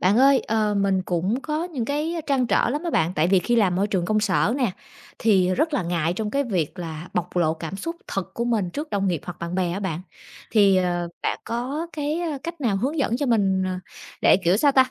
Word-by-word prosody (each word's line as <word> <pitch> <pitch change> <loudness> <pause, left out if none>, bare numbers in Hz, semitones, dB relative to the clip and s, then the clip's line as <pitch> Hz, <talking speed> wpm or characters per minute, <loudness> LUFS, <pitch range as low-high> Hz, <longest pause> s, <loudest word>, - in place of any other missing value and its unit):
Bạn 195 +5 +3
ơi, 270 +1 +6
ờ, 215 -1 0
mình 195 -1 +2
cũng 185 +7 -1
có 310 +2 -2
những 300 -10 -3
cái 300 +6 -1
trăn 265 -3 +2
trở - - +2
lắm 295 +5 -2
á 340 - -1
bạn, 160 - +1
tại 155 +3 +3
vì 190 0 +5
khi 240 +6 +1
làm 190 -6 +3
môi 195 +2 +2
trường 190 -4 -1
công 215 +4 +1
sở 210 +2 +2
nè, 250 -8 0 0.5
thì 185 -4 +3
rất 315 - +1
là 260 - +1
ngại 170 -1 0
trong 210 +3 -3
cái 280 +3 0
việc 185 - -2
là 165 0 -6
bộc 180 0 -2
lộ 160 -2 +2
cảm 165 +3 -6
xúc 335 - -5
thật 195 -2 -4
của 235 - -1
mình 215 -7 0
trước 295 - -5
đồng 200 -1 0
nghiệp 170 -5 -1
hoặc 175 -3 -7
bạn 170 +1 -4
bè 180 -2 0
á 195 - -3
bạn. 175 -5 -3 0.5
Thì, 200 -3 +5
ờ, 175 -1 0
bạn - - -1
có 265 +8 -3
cái 300 +2 -2 0.2
cách 335 0 -6
nào 225 -7 +1
hướng 275 +10 -1
dẫn 240 -4 +1
cho 285 - -1
mình, 195 -5 +2
ờ, 185 0 -2 0.4
để, - - +6
kiểu, 175 +3 +4
sao 285 +6 +4
ta, 260 -1 +4
205 Hz, 245 wpm, -24 LUFS, 180-265 Hz, 0.5 s, ơi